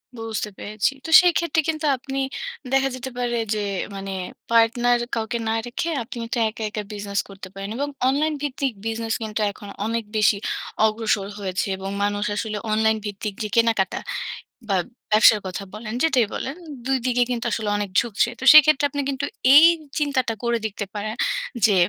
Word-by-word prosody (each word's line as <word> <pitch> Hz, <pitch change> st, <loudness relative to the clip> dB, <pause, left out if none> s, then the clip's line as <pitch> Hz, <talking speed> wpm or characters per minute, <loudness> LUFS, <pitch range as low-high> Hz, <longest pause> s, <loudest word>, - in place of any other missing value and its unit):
বুঝতে 225 Hz, -2 st, -4 dB
পেরেছি। 210 Hz, +4 st, -1 dB
তো -, -, -5 dB
সেইক্ষেত্রে 340 Hz, -2 st, +2 dB
কিন্তু 310 Hz, -1 st, -2 dB
আপনি 270 Hz, +2 st, -5 dB, 0.5 s
দেখা 270 Hz, 0 st, +3 dB
যেতে 260 Hz, +1 st, -6 dB
পারে 240 Hz, -1 st, -1 dB, 0.2 s
যে, 215 Hz, -, -1 dB, 0.4 s
মানে 195 Hz, 0 st, -5 dB, 0.4 s
পার্টনার 240 Hz, +1 st, +4 dB, 0.2 s
কাউকে 225 Hz, +1 st, -2 dB
না 220 Hz, -, +1 dB
রেখে 245 Hz, +7 st, -3 dB
আপনি 230 Hz, -, -8 dB
কিন্তু 235 Hz, +2 st, -3 dB
একা, 220 Hz, -, -7 dB
একা 210 Hz, 0 st, -4 dB
বিজনেস 200 Hz, -1 st, -3 dB
করতে 195 Hz, -1 st, -9 dB
পারেন 195 Hz, 0 st, -6 dB
এবং 285 Hz, +2 st, -1 dB, 0.2 s
অনলাইন 300 Hz, +3 st, +1 dB
ভিত্তিক 275 Hz, -3 st, -2 dB
বিজনেস 225 Hz, 0 st, -2 dB
কিন্তু 215 Hz, 0 st, -3 dB
এখন 205 Hz, -, -12 dB, 0.2 s
অনেক 230 Hz, +1 st, -1 dB
বেশি 210 Hz, -1 st, +4 dB, 0.5 s
অগ্রসর 215 Hz, -2 st, 0 dB
হয়েছে। 190 Hz, -1 st, -2 dB
এবং 190 Hz, 0 st, -5 dB
মানুষ 205 Hz, 0 st, 0 dB
আসলে 215 Hz, 0 st, -3 dB
অনলাইন 220 Hz, 0 st, +3 dB
ভিত্তিক 205 Hz, 0 st, -4 dB
যে -, -, -2 dB
কেনাকাটা 225 Hz, -4 st, +2 dB, 0.7 s
বা, 195 Hz, -, +2 dB, 0.4 s
ব্যবসার 215 Hz, 0 st, +7 dB
কথা 185 Hz, +2 st, -5 dB
বলেন, 215 Hz, +1 st, -6 dB
যেটাই 255 Hz, -8 st, +3 dB
বলেন 270 Hz, +3 st, -4 dB, 0.3 s
২ 265 Hz, 0 st, +2 dB
দিকে 245 Hz, -1 st, +3 dB
কিন্তু 235 Hz, -2 st, -2 dB
আসলে 215 Hz, -2 st, -1 dB
অনেক 205 Hz, -1 st, -2 dB
ঝুঁকছে। 235 Hz, 0 st, +1 dB
তো -, -, -7 dB
সেক্ষেত্রে 305 Hz, -1 st, +7 dB
আপনি 285 Hz, +1 st, -2 dB
কিন্তু 275 Hz, +1 st, -2 dB, 0.3 s
এই 310 Hz, -, +10 dB, 0.3 s
চিন্তাটা 265 Hz, -6 st, 0 dB
করে 235 Hz, 0 st, +1 dB
দেখতে 205 Hz, -1 st, -3 dB
পারেন 215 Hz, +1 st, -3 dB, 0.5 s
যে 205 Hz, -, +3 dB
225 Hz, 165 wpm, -23 LUFS, 210-265 Hz, 0.7 s, এই